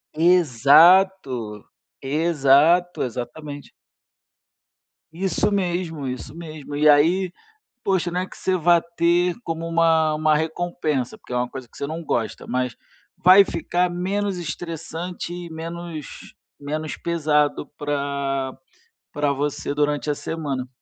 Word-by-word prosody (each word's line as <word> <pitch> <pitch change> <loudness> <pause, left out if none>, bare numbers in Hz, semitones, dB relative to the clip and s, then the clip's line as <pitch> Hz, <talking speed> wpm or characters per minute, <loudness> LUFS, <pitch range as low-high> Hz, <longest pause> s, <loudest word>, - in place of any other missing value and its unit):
Exato, 155 - +4 0.4
exato, 155 +3 +3
exatamente. 145 +4 -6 1.4
Isso 185 +3 0
mesmo, 175 -6 -2
isso 125 +1 -6
mesmo. 155 -4 -8
E 150 +1 +3
aí, 170 +5 +4 0.5
poxa, 185 -2 0
né 180 +1 -2
que - - -14
você 185 -1 0
vá 170 0 +4
ter 170 +1 +1
como 165 0 -4
uma 165 -2 +3
uma 155 0 +2
recompensa, 160 -4 -2
porque - - -12
é 125 - -1
uma 125 0 0
coisa 130 -2 -9
que - - -20
você 140 - -3
não 160 +3 -5
gosta, 115 -6 -2
mas 125 -1 -2 0.4
vai 190 +2 +7
ficar 175 0 -1
menos 190 +2 -2
estressante 170 +1 -6
e 175 -1 -7
menos 165 -1 -8 0.3
menos 155 +2 -4
pesado 150 -3 0
para 140 -2 -2 0.6
para 145 -1 0
você 145 0 -3
durante 150 0 0
a - - +1
semana. 140 -5 -4
160 Hz, 120 wpm, -22 LUFS, 145-175 Hz, 1.4 s, vai